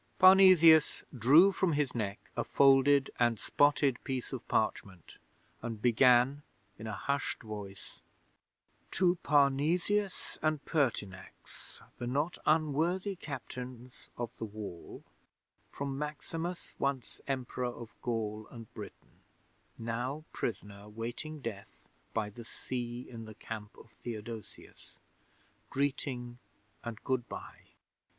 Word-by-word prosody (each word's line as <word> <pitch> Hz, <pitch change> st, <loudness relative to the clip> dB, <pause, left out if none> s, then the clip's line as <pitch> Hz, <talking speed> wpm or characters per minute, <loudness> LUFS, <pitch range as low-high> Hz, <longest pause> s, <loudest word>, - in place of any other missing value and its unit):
Parnesius 185 Hz, -4 st, +7 dB
drew 145 Hz, -, +7 dB
from 185 Hz, -3 st, +1 dB
his 145 Hz, -2 st, 0 dB
neck 105 Hz, -4 st, -4 dB
a -, -, 0 dB
folded 135 Hz, 0 st, +5 dB
and 120 Hz, -3 st, +3 dB
spotted 145 Hz, -3 st, +2 dB
piece 130 Hz, -2 st, -3 dB
of -, -, -6 dB
parchment, 95 Hz, -5 st, -2 dB, 0.4 s
and 115 Hz, -2 st, -4 dB
began 125 Hz, +4 st, +5 dB, 0.4 s
in 110 Hz, -, -6 dB
a -, -, -3 dB
hushed 140 Hz, +8 st, -2 dB
voice: 105 Hz, -3 st, -8 dB, 0.9 s
'"_To 180 Hz, -1 st, +3 dB
Parnesius 155 Hz, +8 st, +2 dB
and 155 Hz, -2 st, 0 dB
Pertinax, 105 Hz, -, -3 dB, 0.2 s
the 120 Hz, -, -3 dB
not 145 Hz, +7 st, -1 dB
unworthy 165 Hz, +6 st, +2 dB
Captains 125 Hz, -5 st, -7 dB, 0.2 s
of 120 Hz, -1 st, -3 dB
the 115 Hz, -, -4 dB
Wall, 105 Hz, -5 st, -8 dB, 0.7 s
from 140 Hz, -1 st, -4 dB
Maximus, 165 Hz, +4 st, -5 dB
once 140 Hz, -3 st, -2 dB
Emperor 130 Hz, -2 st, -2 dB
of 120 Hz, -2 st, -8 dB
Gaul 110 Hz, -2 st, -2 dB
and 115 Hz, -2 st, -11 dB
Britain, -, -, -11 dB, 0.6 s
now 120 Hz, +6 st, -3 dB
prisoner 105 Hz, -2 st, -5 dB
waiting 120 Hz, +8 st, -5 dB
death 105 Hz, -4 st, -8 dB, 0.2 s
by 105 Hz, -2 st, -2 dB
the 120 Hz, +3 st, -10 dB
sea 120 Hz, +1 st, -5 dB
in 115 Hz, -2 st, -8 dB
the 110 Hz, -1 st, -10 dB
camp 105 Hz, -1 st, -8 dB
of 115 Hz, -, -15 dB
Theodosius 115 Hz, -2 st, -9 dB, 0.7 s
Greeting 130 Hz, -3 st, -2 dB, 0.4 s
and 115 Hz, -2 st, -6 dB
Good 130 Hz, -2 st, -1 dB
bye! -, -, -9 dB
125 Hz, 115 wpm, -32 LUFS, 115-145 Hz, 0.9 s, Parnesius